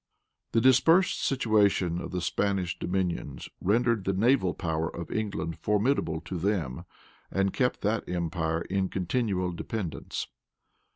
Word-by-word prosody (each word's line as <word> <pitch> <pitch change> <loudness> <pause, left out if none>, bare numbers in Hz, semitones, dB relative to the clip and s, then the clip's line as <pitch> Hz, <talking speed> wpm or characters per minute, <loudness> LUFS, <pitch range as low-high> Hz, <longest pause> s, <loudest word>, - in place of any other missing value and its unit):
The 115 - +4
dispersed 160 +9 +4
situation 100 -8 +2
of - - -5
the 90 -1 -3
Spanish 95 0 -1
dominions 90 -1 -2
rendered 115 +1 +2
the 95 - +1
naval 105 -2 +3
power 80 -1 -1
of 85 -1 -7
England 100 -6 -3
formidable 105 - +1
to 90 0 -5
them, 85 -9 -1 0.4
and 95 0 0
kept 125 -1 0
that 105 +1 -1
empire 85 -2 -1
in 95 0 -1
continual 95 -1 -1
dependence. 90 0 -4
95 Hz, 125 wpm, -28 LUFS, 85-110 Hz, 0.4 s, The